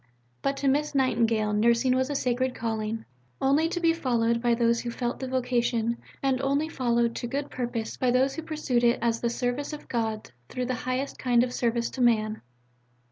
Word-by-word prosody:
But 275 Hz, 0 st, 0 dB
to 275 Hz, -, -1 dB
Miss 290 Hz, +2 st, +1 dB
Nightingale 230 Hz, -5 st, +2 dB
Nursing 235 Hz, +4 st, +3 dB
was 260 Hz, +1 st, +1 dB
a 290 Hz, -, -2 dB
Sacred 255 Hz, 0 st, 0 dB
Calling, 220 Hz, -1 st, -3 dB, 0.3 s
only 290 Hz, +5 st, +3 dB
to 350 Hz, -, -2 dB
be 330 Hz, -1 st, +3 dB
followed 235 Hz, -7 st, +1 dB
by 240 Hz, -1 st, +3 dB
those 235 Hz, 0 st, +2 dB
who 240 Hz, -, -4 dB
felt 240 Hz, +1 st, -3 dB
the 265 Hz, -, -4 dB
vocation, 240 Hz, -2 st, 0 dB, 0.3 s
and 265 Hz, -1 st, +1 dB
only 280 Hz, +3 st, +1 dB
followed 235 Hz, -5 st, 0 dB
to 240 Hz, -, -3 dB
good 280 Hz, +3 st, -3 dB
purpose 240 Hz, -3 st, -3 dB
by 255 Hz, -, +1 dB
those 260 Hz, +2 st, +3 dB
who 320 Hz, -, -4 dB
pursued 300 Hz, -6 st, -1 dB
it 235 Hz, 0 st, +4 dB
as 230 Hz, -1 st, 0 dB
the 235 Hz, -, +1 dB
service 245 Hz, +5 st, -2 dB
of 300 Hz, -, -8 dB
God 220 Hz, -2 st, -2 dB, 0.2 s
through 250 Hz, -, -3 dB
the 255 Hz, -, -1 dB, 0.2 s
highest 260 Hz, +2 st, -2 dB
kind 245 Hz, -2 st, +3 dB
of 250 Hz, 0 st, -3 dB
service 235 Hz, -1 st, 0 dB
to 260 Hz, -, -4 dB
man. 220 Hz, -3 st, +2 dB
245 Hz, 195 wpm, -27 LUFS, 235-270 Hz, 0.3 s, it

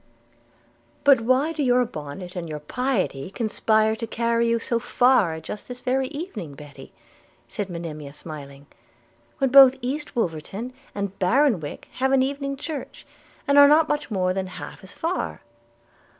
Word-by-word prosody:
'But 275 Hz, -4 st, +6 dB
why 260 Hz, +7 st, +2 dB
do 315 Hz, -2 st, -3 dB
your 250 Hz, -2 st, +3 dB
bonnet 180 Hz, -3 st, -8 dB
and 170 Hz, -2 st, -5 dB
your 155 Hz, -, -4 dB
piety 185 Hz, -, -2 dB
conspire 220 Hz, 0 st, +1 dB
to 230 Hz, -, -4 dB
carry 235 Hz, +1 st, +1 dB
you 230 Hz, 0 st, +2 dB
so 230 Hz, 0 st, -1 dB
far 230 Hz, -10 st, +3 dB
just 180 Hz, +6 st, -8 dB
this 250 Hz, 0 st, -7 dB
very 260 Hz, +1 st, 0 dB
evening, 255 Hz, -, -7 dB
Betty,' 145 Hz, -1 st, -12 dB, 0.6 s
said 200 Hz, -, -4 dB
Monimia 155 Hz, -4 st, -6 dB
smiling, 140 Hz, -2 st, -10 dB, 0.7 s
'when 270 Hz, -2 st, +1 dB
both 270 Hz, -1 st, +9 dB
East 280 Hz, +4 st, -4 dB
Wolverton 200 Hz, +4 st, -3 dB, 0.2 s
and 200 Hz, -1 st, -4 dB
Bartonwick 200 Hz, -, +1 dB
have 265 Hz, +1 st, +2 dB
an 265 Hz, -1 st, +5 dB
evening 275 Hz, 0 st, -3 dB
church, 295 Hz, 0 st, -7 dB, 0.4 s
and 280 Hz, 0 st, +6 dB
are 285 Hz, -, +10 dB
not 305 Hz, +2 st, +5 dB
much 295 Hz, -2 st, -2 dB
more 185 Hz, -4 st, 0 dB
than 190 Hz, 0 st, -2 dB
half 185 Hz, -, -9 dB
as 190 Hz, -, -11 dB
far?' 340 Hz, +3 st, -3 dB
230 Hz, 150 wpm, -24 LUFS, 180-270 Hz, 0.7 s, are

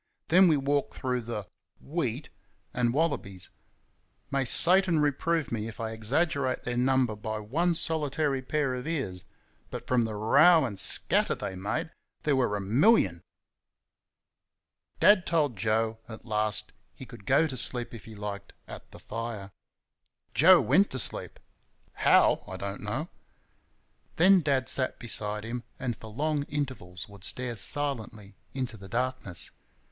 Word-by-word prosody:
Then 185 Hz, +3 st, +6 dB
we 155 Hz, -3 st, +4 dB
walked 140 Hz, +1 st, -1 dB
through 125 Hz, -1 st, -2 dB
the 110 Hz, -3 st, -5 dB, 0.3 s
"wheat" 140 Hz, -4 st, -4 dB, 0.4 s
and 120 Hz, -1 st, +1 dB
wallabies! 125 Hz, -, -2 dB, 0.8 s
May 135 Hz, -1 st, 0 dB
Satan 180 Hz, +3 st, +5 dB
reprove 150 Hz, +2 st, 0 dB
me 110 Hz, -2 st, -3 dB
if 110 Hz, -, -9 dB
I 110 Hz, -1 st, -3 dB
exaggerate 130 Hz, +4 st, -1 dB
their 125 Hz, -, -3 dB
number 125 Hz, -2 st, +1 dB
by 110 Hz, +1 st, -5 dB
one 160 Hz, +12 st, 0 dB
solitary 150 Hz, -4 st, -1 dB
pair 140 Hz, 0 st, -1 dB
of 125 Hz, +3 st, -5 dB
ears 130 Hz, -, -3 dB, 0.4 s
but -, -, -7 dB
from 125 Hz, -2 st, +1 dB
the 110 Hz, -1 st, -5 dB
row 155 Hz, +10 st, +5 dB
and 100 Hz, -6 st, -5 dB
scatter 90 Hz, -, +3 dB
they 95 Hz, -, -5 dB
made 100 Hz, -, -3 dB, 0.3 s
there 150 Hz, -2 st, +2 dB
were 125 Hz, -6 st, +1 dB
a -, -, -2 dB
MILLION. 100 Hz, -, +3 dB, 1.8 s
Dad 205 Hz, -3 st, +5 dB
told 150 Hz, -7 st, +1 dB
Joe, 110 Hz, +2 st, 0 dB
at 110 Hz, 0 st, -10 dB
last, 110 Hz, -2 st, -1 dB, 0.2 s
he 130 Hz, -, -10 dB
could 115 Hz, -4 st, -14 dB
go 140 Hz, +5 st, +4 dB
to 140 Hz, -5 st, -4 dB
sleep 125 Hz, -1 st, 0 dB
if 115 Hz, -, -10 dB
he 110 Hz, -, -11 dB
liked, 100 Hz, -1 st, -7 dB
at -, -, -11 dB
the -, -, -13 dB
fire. 110 Hz, -3 st, -6 dB, 0.8 s
Joe 180 Hz, +4 st, +7 dB
went 200 Hz, +4 st, +3 dB
to 130 Hz, -, -4 dB
sleep -, -, -1 dB, 0.5 s
HOW, -, -, +3 dB
I -, -, -7 dB
don't 100 Hz, 0 st, -5 dB
know. 125 Hz, +11 st, -4 dB, 1.1 s
Then 185 Hz, +2 st, +5 dB
Dad 135 Hz, -4 st, 0 dB
sat 130 Hz, 0 st, 0 dB
beside 105 Hz, -3 st, -2 dB
him, 120 Hz, +2 st, -5 dB, 0.2 s
and 125 Hz, -2 st, -3 dB
for 110 Hz, -, -12 dB
long 145 Hz, +7 st, -1 dB
intervals 125 Hz, -11 st, -5 dB
would 100 Hz, -2 st, -15 dB
stare 125 Hz, +2 st, -2 dB
silently 110 Hz, -6 st, -1 dB, 0.2 s
into 130 Hz, -4 st, -3 dB
the 95 Hz, -1 st, -12 dB
darkness. 125 Hz, -6 st, -2 dB
125 Hz, 150 wpm, -28 LUFS, 110-145 Hz, 1.8 s, Joe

